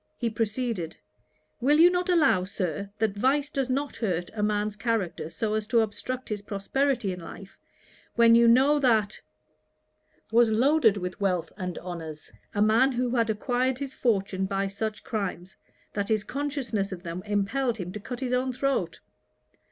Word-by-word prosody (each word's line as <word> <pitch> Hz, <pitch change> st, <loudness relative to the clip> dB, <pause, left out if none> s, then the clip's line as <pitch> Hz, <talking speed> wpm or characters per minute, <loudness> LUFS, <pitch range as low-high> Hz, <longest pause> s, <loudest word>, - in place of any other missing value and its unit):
He 235 Hz, -2 st, -1 dB
proceeded: 220 Hz, -5 st, -2 dB, 0.6 s
'Will 285 Hz, +5 st, +3 dB
you 345 Hz, +2 st, +8 dB
not 360 Hz, 0 st, -1 dB
allow, 310 Hz, -, +4 dB
Sir, 190 Hz, -1 st, -3 dB
that 215 Hz, -2 st, 0 dB
vice 275 Hz, +6 st, +1 dB
does 270 Hz, -3 st, -1 dB
not 275 Hz, +3 st, -2 dB
hurt 175 Hz, -6 st, -2 dB
a 215 Hz, -, -3 dB
man's 210 Hz, 0 st, 0 dB
character 200 Hz, -7 st, -2 dB
so 215 Hz, +5 st, -2 dB
as 215 Hz, -1 st, -1 dB
to 230 Hz, 0 st, +4 dB
obstruct 250 Hz, +4 st, -4 dB
his 210 Hz, -2 st, -3 dB
prosperity 220 Hz, +3 st, -1 dB
in 180 Hz, -, -8 dB
life, 190 Hz, +3 st, -10 dB, 0.6 s
when 230 Hz, -1 st, +6 dB
you 235 Hz, 0 st, +6 dB
know 270 Hz, +5 st, +5 dB
that 220 Hz, -6 st, +2 dB, 1.1 s
was 230 Hz, 0 st, +5 dB
loaded 230 Hz, -1 st, +4 dB
with 180 Hz, +1 st, -5 dB
wealth 180 Hz, -4 st, 0 dB
and 185 Hz, -2 st, -5 dB
honours; 165 Hz, -4 st, -7 dB, 0.2 s
a 205 Hz, -, +3 dB
man 235 Hz, +5 st, +4 dB
who 245 Hz, 0 st, -1 dB
had 230 Hz, -2 st, +2 dB
acquired 245 Hz, +4 st, 0 dB
his 275 Hz, -1 st, -5 dB
fortune 195 Hz, -4 st, 0 dB
by 195 Hz, 0 st, -1 dB
such 210 Hz, +2 st, -4 dB
crimes, 190 Hz, -5 st, -4 dB, 0.4 s
that 205 Hz, -1 st, -2 dB
his 215 Hz, -2 st, +1 dB
consciousness 265 Hz, -8 st, -2 dB
of 185 Hz, -1 st, -7 dB
them 170 Hz, +1 st, -5 dB
impelled 225 Hz, +5 st, 0 dB
him 180 Hz, -3 st, -5 dB
to 210 Hz, -, -6 dB
cut 240 Hz, +4 st, -7 dB
his 250 Hz, -1 st, -1 dB
own 255 Hz, +1 st, +1 dB
throat.' 275 Hz, +2 st, -1 dB
220 Hz, 165 wpm, -27 LUFS, 195-255 Hz, 1.1 s, you